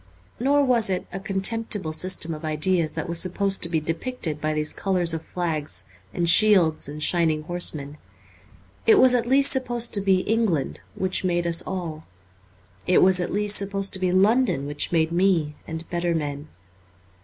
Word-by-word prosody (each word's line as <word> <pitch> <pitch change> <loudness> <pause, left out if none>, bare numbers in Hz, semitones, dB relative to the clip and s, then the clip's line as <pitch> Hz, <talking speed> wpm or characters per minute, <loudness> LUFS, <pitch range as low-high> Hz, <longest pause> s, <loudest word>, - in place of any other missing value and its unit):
Nor 280 +3 +2
was 240 -5 +2
it 185 -1 -3
a 195 - -5
contemptible 195 -2 0
system 170 -1 +1
of 155 +1 -9
ideas 155 +1 0
that - - -4
was 170 -1 -1
supposed 195 +2 0
to 170 - -2
be 165 -2 0
depicted 165 - -4
by 155 - -1
these 155 0 -2
colours 180 -4 -2
of 160 0 -5
flags 160 -4 -3 0.3
and 175 -2 -2
shields 170 -6 +5
and 150 +1 -4
shining 160 -3 +1
horsemen. 155 -4 -4 0.9
It 445 - +7
was 255 -8 +5
at 240 -1 0
least 275 +2 +4
supposed 240 -3 -1
to 200 - +4
be 190 -1 +2
England, 210 - -1
which 185 0 +1
made 175 -1 -1
us 170 -1 +2
all; 165 -4 -6 0.8
it 180 - +4
was 185 0 +4
at 175 - -3
least 210 +1 +2
supposed 195 0 -2
to 190 - -1
be 185 -1 0
London, 200 - +2
which 145 0 -3
made 160 -1 +1
me 170 -4 +1
and 160 0 -7
better 175 -1 -1
men. 145 -1 -5
180 Hz, 175 wpm, -23 LUFS, 160-200 Hz, 0.9 s, It